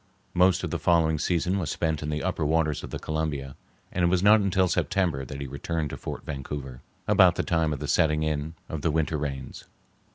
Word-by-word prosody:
Most 90 0 +3
of - - -3
the - - -2
following 80 -3 +3
season 90 +4 0
was 80 -6 -2
spent 80 -2 -1
on 75 - -3
the 75 0 -2
upper 90 -3 -1
waters 80 -1 +1
of - - -6
the - - -4
Columbia, 75 -4 -3 0.4
and 90 - -1
it - - +5
was 90 +1 +2
not 105 +2 +7
until 95 -1 +2
September 85 -6 0
that 70 +2 -7
he 70 - -4
returned 75 +3 -3
to - - -4
Fort - - -7
Vancouver, 70 -3 -6 0.3
about - - +6
the - - -1
time 80 -2 +1
of 75 - -2
the 75 +1 -5
setting 75 +1 +2
in 80 +1 -2
of 80 - -5
the 80 - +1
winter 80 0 0
rains. 70 -3 -5
80 Hz, 220 wpm, -26 LUFS, 75-85 Hz, 0.4 s, not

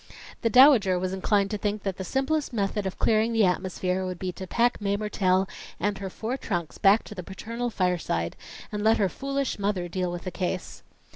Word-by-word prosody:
The 230 - +2
Dowager 250 -8 +6
was 185 +1 -2
inclined 200 +1 +1
to 210 - -2
think 205 0 -2
that 195 -2 -2
the 190 - -4
simplest 270 - -1
method 200 -2 -1
of 190 - -5
clearing 225 +1 +2
the 225 -2 +4
atmosphere 185 0 -1
would 185 -1 -4
be 185 +1 -3
to 190 +1 -8
pack 240 +3 +1
Mae 200 0 0
Mertelle 195 -3 +1 0.3
and 200 +1 -1
her 195 -1 -4
four 225 +7 -4
trunks 175 - -4
back 200 +2 +5
to - - -9
the 190 - -6
paternal 230 +6 -5
fireside, 180 - -1 0.4
and 210 -1 -3
let 220 +1 +5
her 195 -3 +2
foolish 275 +3 -3
mother 200 -3 -1
deal 180 0 -2
with 175 0 -6
the 185 - -4
case. 185 0 -4
200 Hz, 205 wpm, -26 LUFS, 185-220 Hz, 0.4 s, Dowager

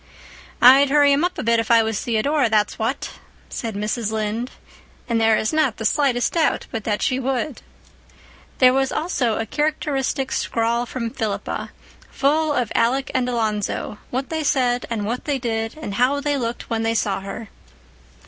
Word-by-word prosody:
"I'd 270 +3 +8
hurry 290 0 +5
him 285 +3 +2
up 360 +1 -1
a - - -3
bit, 230 0 +3
if 225 - -2
I 230 -1 +6
was 220 -2 -2
Theodora, 245 +4 +1
that's 215 0 +1
what," 230 +5 -2 0.4
said 225 -3 -5
Mrs. 210 +1 -2
Lynde. 220 +3 -2 0.6
And 230 -2 +1
there 225 -1 +4
is 215 - -1
not 310 -8 +1
the 220 - -5
slightest 250 0 +1
doubt 330 -2 +1
but 220 -2 -4
that 210 -2 -1
she 255 0 +1
would. 265 +2 -2 1.0
There 255 -1 +6
was 270 0 +1
also 270 -9 0
a 225 - -2
characteristic 280 -1 -1
scrawl 235 +1 0
from 230 -2 -4
Philippa, 215 -3 -3 0.4
full 305 +2 +1
of 250 -6 -1
Alec 255 +4 +1
and 250 -1 0
Alonzo, 215 -3 -2
what 260 +2 -3
they 320 -1 -1
said 250 -4 +1
and 220 -3 -2
what 235 +4 -3
they 290 -2 0
did, 225 -1 -3
and 260 -10 -6
how 255 +6 +2
they 290 0 0
looked 240 -3 -3
when 225 -1 -1
they 225 0 0
saw 200 -3 0
her. 200 +3 -7
240 Hz, 175 wpm, -22 LUFS, 225-275 Hz, 1.0 s, I'd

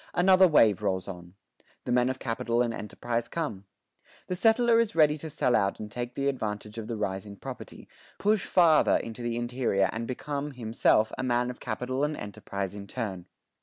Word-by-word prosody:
Another 185 +1 +6
wave 110 - +4
rolls 95 -3 -1
on. 90 -1 -9 0.5
The - - -2
men 125 +1 +3
of 130 - -2
capital 120 -1 0
and 120 -1 -2
enterprise 115 +2 -3
come. 125 - -4 0.6
The 180 - -3
settler 230 +3 +4
is 230 -5 0
ready 150 -2 +5
to 160 - -6
sell 140 -4 +1
out 100 -2 +1
and 105 -1 -7
take 120 +2 -5
the 140 0 -1
advantage 105 -4 -3
of 110 - -6
the 115 - -4
rise 95 -1 -3
in 100 - -9
property, - - -9 0.3
push 210 -1 +2
farther 165 -4 +4
into 115 +1 -7
the 120 0 -2
interior 120 -6 0
and 115 +1 -4
become, 145 +2 -4
himself, 110 -2 +2
a - - -1
man 125 0 +1
of 125 - -12
capital 125 +4 -3
and 150 +1 -1
enterprise 100 -1 -5
in 100 -1 -8
turn. 95 -4 -5
120 Hz, 190 wpm, -28 LUFS, 105-145 Hz, 0.6 s, Another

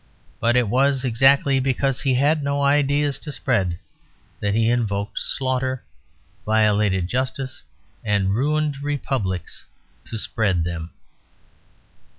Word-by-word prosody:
But 120 +1 +2
it 125 -2 +3
was 135 +3 +2
exactly 135 +3 +4
because 135 0 0
he 135 -3 +1
had 145 +4 +2
no 140 0 -1
ideas 145 0 +2
to 150 - -6
spread 95 -9 0 0.6
that 100 0 -1
he 115 0 +2
invoked 105 -4 -1
slaughter, 130 -1 -1 0.6
violated 105 -4 +2
justice, 130 +3 -3 0.4
and 100 -3 +1
ruined 145 +3 0
republics 130 - -3 0.4
to 115 - -5
spread 100 -5 0
them. 85 -1 -4
125 Hz, 115 wpm, -22 LUFS, 105-140 Hz, 0.6 s, exactly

